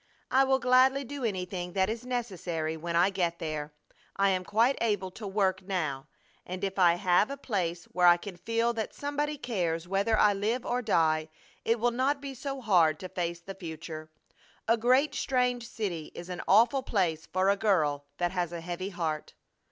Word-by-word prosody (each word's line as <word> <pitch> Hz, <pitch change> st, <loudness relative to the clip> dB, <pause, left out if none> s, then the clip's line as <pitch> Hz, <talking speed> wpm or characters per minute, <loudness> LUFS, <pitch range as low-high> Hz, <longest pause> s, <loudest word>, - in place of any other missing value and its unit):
I 265 Hz, +1 st, +5 dB
will 265 Hz, 0 st, +3 dB
gladly 260 Hz, +2 st, +4 dB
do 275 Hz, +1 st, -7 dB
anything 180 Hz, -4 st, -3 dB
that 190 Hz, -1 st, +2 dB
is 230 Hz, +3 st, -4 dB
necessary 180 Hz, -10 st, -3 dB
when 170 Hz, +1 st, -4 dB
I 180 Hz, +4 st, +4 dB
get 175 Hz, -3 st, -1 dB
there. 155 Hz, -2 st, -4 dB, 0.4 s
I 200 Hz, 0 st, +3 dB
am 185 Hz, -1 st, 0 dB
quite 230 Hz, +8 st, +2 dB
able 205 Hz, -5 st, 0 dB
to 210 Hz, +3 st, -8 dB
work 190 Hz, -1 st, +1 dB
now; 155 Hz, -8 st, -3 dB, 0.4 s
and 185 Hz, +2 st, -6 dB
if 195 Hz, 0 st, -2 dB
I 175 Hz, -2 st, +6 dB
have 180 Hz, +5 st, +3 dB
a 280 Hz, -, -5 dB
place 175 Hz, -10 st, -2 dB
where 180 Hz, +1 st, +2 dB
I 175 Hz, 0 st, +8 dB
can 190 Hz, +1 st, -8 dB
feel 230 Hz, +5 st, 0 dB
that 220 Hz, -2 st, -4 dB
somebody 290 Hz, +1 st, -2 dB
cares 175 Hz, -, -2 dB
whether 200 Hz, +4 st, +1 dB
I 210 Hz, -1 st, +5 dB
live 220 Hz, +5 st, -1 dB
or 245 Hz, +1 st, 0 dB
die 160 Hz, -7 st, +2 dB, 0.3 s
it 230 Hz, +1 st, +1 dB
will 240 Hz, +2 st, +2 dB
not 265 Hz, +4 st, +1 dB
be 275 Hz, -1 st, -6 dB
so 270 Hz, +1 st, -5 dB
hard 170 Hz, -9 st, +3 dB
to 185 Hz, -, -6 dB
face 170 Hz, -2 st, -3 dB
the 195 Hz, +3 st, -8 dB
future. 160 Hz, -3 st, -8 dB, 0.6 s
A 230 Hz, -, +5 dB
great, 255 Hz, +6 st, +3 dB
strange 250 Hz, -2 st, 0 dB
city 180 Hz, -10 st, -4 dB
is 175 Hz, +1 st, -8 dB
an 180 Hz, -, -4 dB
awful 235 Hz, +7 st, +5 dB
place 175 Hz, -10 st, -1 dB
for 185 Hz, +1 st, +2 dB
a -, -, +2 dB
girl 155 Hz, -9 st, +1 dB
that 175 Hz, -1 st, 0 dB
has 175 Hz, -2 st, -1 dB
a 170 Hz, -1 st, -5 dB
heavy 175 Hz, +3 st, -4 dB
heart! 165 Hz, -5 st, -4 dB
195 Hz, 190 wpm, -29 LUFS, 175-235 Hz, 0.6 s, I